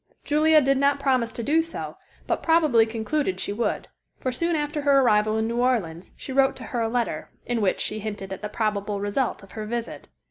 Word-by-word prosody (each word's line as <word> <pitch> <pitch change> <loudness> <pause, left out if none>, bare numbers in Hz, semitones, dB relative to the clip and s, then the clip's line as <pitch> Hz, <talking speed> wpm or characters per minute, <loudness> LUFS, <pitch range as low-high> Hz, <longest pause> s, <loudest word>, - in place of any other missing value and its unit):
Julia 310 +1 +4
did 275 0 +2
not 280 0 +3
promise 255 -4 +1
to 235 - -4
do 310 +6 +3
so, 330 0 -6 0.3
but - - -1
probably 305 -9 +4
concluded 225 -2 -2
she 200 - -2
would, 230 +3 -2 0.3
for 255 - -1
soon 335 +6 0
after 295 0 -2
her 280 -1 +4
arrival 215 -3 +3
in 220 0 0
New 235 +1 -2
Orleans 210 -10 -1
she 265 - -7
wrote 270 0 +3
to - - -9
her 240 - 0
a 225 - 0
letter, 240 0 -2 0.2
in 240 -2 -1
which 195 -3 +1
she 215 - -2
hinted 205 -2 -5
at 190 - -8
the 210 - -4
probable 210 -2 -1
result 205 +3 -1
of 195 - -15
her 215 -1 -6
visit. 235 +1 -5
235 Hz, 215 wpm, -25 LUFS, 215-280 Hz, 0.3 s, Julia